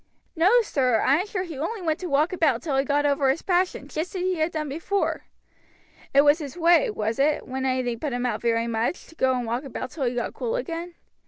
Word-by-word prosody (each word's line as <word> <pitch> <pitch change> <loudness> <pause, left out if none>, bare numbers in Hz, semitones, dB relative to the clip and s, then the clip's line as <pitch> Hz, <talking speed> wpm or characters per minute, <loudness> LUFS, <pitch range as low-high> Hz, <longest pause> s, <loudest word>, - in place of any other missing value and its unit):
"No, 385 +9 +5
sir; 255 - +1
I 275 - +4
am 375 - -2
sure 385 -3 -2
he 325 -7 -7
only 380 +6 -3
went 315 -2 0
out - - -30
to 360 - -4
walk 300 +6 +2
about 300 -9 +1
till 300 -5 -1
he 270 - +3
got 290 +1 +1
over 280 -1 +2
his 270 +5 0
passion, 360 -6 0
just 315 +6 -4
as 365 - -2
he 370 -1 0
had 315 +2 0
done 310 -2 -3
before." 335 +8 -2 0.8
"It 280 - +6
was 290 +2 +4
his 295 +1 -7
way, 335 -2 +4
was 215 +2 -2
it, 295 +2 +1
when 265 +1 -3
anything 255 -3 -1
put 295 +1 -3
him 245 0 -2
out 245 - -1
very 230 -1 +1
much, 230 +7 -2
to 325 - -16
go 260 -4 +2
and 245 - -3
walk 235 +4 -2
about 265 -1 -6
till 280 -5 -3
he 245 0 -1
got 240 - -2
cool 475 0 -3
again?" 345 -7 -4
290 Hz, 250 wpm, -25 LUFS, 260-345 Hz, 0.8 s, It